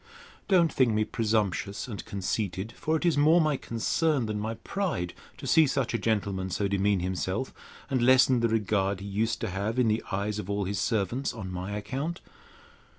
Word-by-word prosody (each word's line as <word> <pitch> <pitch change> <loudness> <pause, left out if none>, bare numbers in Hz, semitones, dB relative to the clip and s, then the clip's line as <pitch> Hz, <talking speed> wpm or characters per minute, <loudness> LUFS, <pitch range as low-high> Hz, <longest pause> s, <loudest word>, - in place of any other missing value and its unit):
Don't 175 -4 +4
think 130 -3 +3
me 110 - +3
presumptuous 105 -3 -1
and 105 -5 -6
conceited; 100 +1 -3
for 155 - -1
it 160 - -4
is 165 -4 +3
more 155 +4 +6
my 155 -3 +2
concern 135 +4 0
than 105 -1 -3
my 110 +2 -3
pride, 140 - -3 0.2
to - - -8
see 160 -2 +5
such 135 -3 -1
a 115 - 0
gentleman 100 -4 -1
so 100 +2 0
demean 100 -1 +1
himself, 95 +6 -2 0.3
and 130 -3 0
lessen 130 0 +5
the 115 0 +2
regard 100 -3 +1
he 100 - -8
used 110 +3 -1
to 115 - -2
have 100 +5 -2
in 125 -3 +3
the 110 +1 0
eyes 100 +2 -1
of 100 -2 -6
all 100 0 0
his 100 +1 -2
servants, 115 +5 -1
on 100 -5 -6
my 90 +3 -4
account. 140 +10 -4
110 Hz, 190 wpm, -28 LUFS, 100-130 Hz, 0.3 s, more